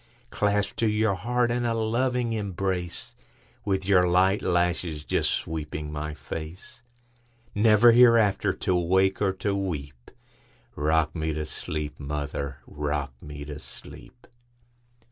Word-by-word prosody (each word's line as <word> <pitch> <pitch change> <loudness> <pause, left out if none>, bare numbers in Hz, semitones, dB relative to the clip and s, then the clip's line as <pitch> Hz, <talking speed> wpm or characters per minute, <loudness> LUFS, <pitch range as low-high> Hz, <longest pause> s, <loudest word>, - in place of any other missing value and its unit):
Clasped 105 -1 0
to 115 - +3
your 105 -1 +2
heart 120 +4 0
in 120 0 0
a 115 -1 0
loving 120 +1 0
embrace, 95 -4 -3 0.5
With 95 -2 -1
your 90 -3 +5
light 95 +3 +3
lashes 85 -3 0
just - - +1
sweeping 75 -1 -3
my 75 0 -4
face, 80 +4 -8 0.7
Never 110 +2 +6
hereafter 115 -5 +5
to 90 - -1
wake 95 +3 +2
or 100 -2 +3
to 100 +1 -2
weep;—Rock 75 -1 -4
me 80 -1 -1
to 75 0 -3
sleep, 75 -1 -5
mother,—rock 70 0 -4
me 75 -1 -8
to 75 0 -7
sleep! 120 +9 -12
90 Hz, 120 wpm, -26 LUFS, 75-105 Hz, 0.7 s, Never